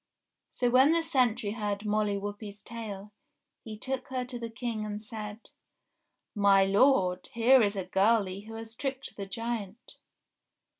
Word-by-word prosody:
So 245 -1 0
when 265 +5 +6
the 335 0 +2
sentry 250 -9 +1
heard 210 -1 -3
Molly 210 -1 +1
Whuppie's 205 0 -6
tale, 210 -3 -7 0.5
he 215 -1 -8
took 265 +3 -4
her 255 -1 -3
to 245 -1 -6
the 230 -1 -5
King 225 -1 -4
and 210 0 -5
said: 215 0 -8 0.8
"My 200 -2 +5
lord! 195 -3 +3
Here 245 +3 +6
is 205 -1 +1
a 190 -2 -3
girlie 195 0 +1
who 225 - -8
has 225 0 -8
tricked 270 +1 -4
the 200 -1 -6
giant 230 +1 -5
215 Hz, 150 wpm, -29 LUFS, 205-240 Hz, 0.8 s, when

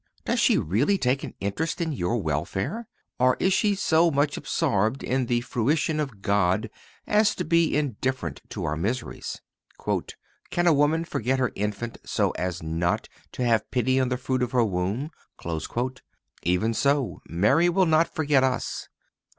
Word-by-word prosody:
Does - - +1
she - - +4
really 120 - +2
take 130 -3 0
an - - -7
interest 150 +12 -2
in 165 -2 -1
your 120 -3 -1
welfare? 95 - -2 0.3
Or 125 0 +4
is 190 - +3
she 205 0 +2
so 170 -3 +3
much 145 -1 +1
absorbed 115 - 0
by 130 - 0
the 120 0 +1
fruition 150 +6 0
of 125 -10 -4
God 100 +2 +1 0.3
as 210 0 +3
to - - -3
be 170 -3 +3
indifferent 130 - -2
to - - -5
our 75 - -1
miseries? 115 +10 -3 1.1
"Can 175 - 0
a 170 - +6
woman 150 +3 +2
forget 130 -3 -1
her 125 -2 +1
infant 105 +3 -3
so - - 0
as 90 -2 -3
not 85 +2 -1 0.2
to 125 - -2
have 115 -3 +2
pity 130 +1 +2
on 130 -1 +1
the 125 - 0
fruit 130 0 -1
of 125 - -1
her 120 -2 +4
womb?"(265) 110 - -4 0.4
Even 90 +6 +1
so 140 +1 +1
Mary 110 - +3
will 185 +2 +3
not 160 0 +4
forget 145 -4 +2
us. 130 -1 -1
125 Hz, 160 wpm, -26 LUFS, 105-150 Hz, 1.1 s, a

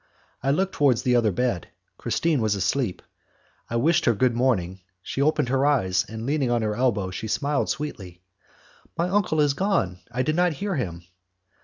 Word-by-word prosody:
I 135 - -1
looked 185 +7 +1
towards 135 -6 +2
the 125 -1 +2
other 115 -3 +3
bed, 120 -3 -1 0.3
Christine 160 -6 0
was 110 -2 +1
asleep. 100 +1 -1 0.7
I 115 - -3
wished 160 +8 +2
her 120 - +3
good 125 +3 +2
morning, 105 -7 0 0.2
she 135 - -3
opened 150 -2 +2
her 135 +1 +2
eyes, 95 -11 +2
and 110 +1 -6
leaning 140 -2 0
on 120 -1 +1
her 105 -1 -1
elbow, 105 -7 0
she 110 +4 -5
smiled 140 +6 0
sweetly. 95 - -5 0.7
"My 170 +1 +1
uncle 185 -4 +1
has 145 -2 +3
gone. 155 - 0
I 130 +2 -1
did 155 +4 0
not 175 -1 +2
hear 200 +7 -3
him." 90 - -4
125 Hz, 180 wpm, -24 LUFS, 105-150 Hz, 0.7 s, other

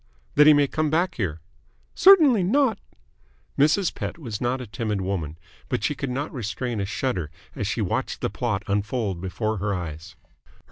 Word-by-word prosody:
"That 150 - +6
he 155 - +9
may 145 -1 +4
come 155 +2 -1
back 170 +4 +1
here?" 85 -8 -2 0.5
"Certainly 315 - +7
not." 230 +3 +2 0.8
Mrs. 155 +6 +3
Pett - - -5
was 115 -10 -6
not 125 +1 0
a 125 - -6
timid 110 -2 -3
woman, 85 -5 -3 0.3
but - - -1
she 150 - +1
could 140 -1 -4
not 140 +6 -3
restrain 120 -1 -3
a - - -1
shudder 105 - -2 0.3
as - - -2
she - - -1
watched - - -2
the - - 0
plot 100 - -2
unfold 100 -2 -1
before 110 +4 -2
her 100 +1 -1
eyes. 80 -3 -7
120 Hz, 175 wpm, -24 LUFS, 100-150 Hz, 0.8 s, he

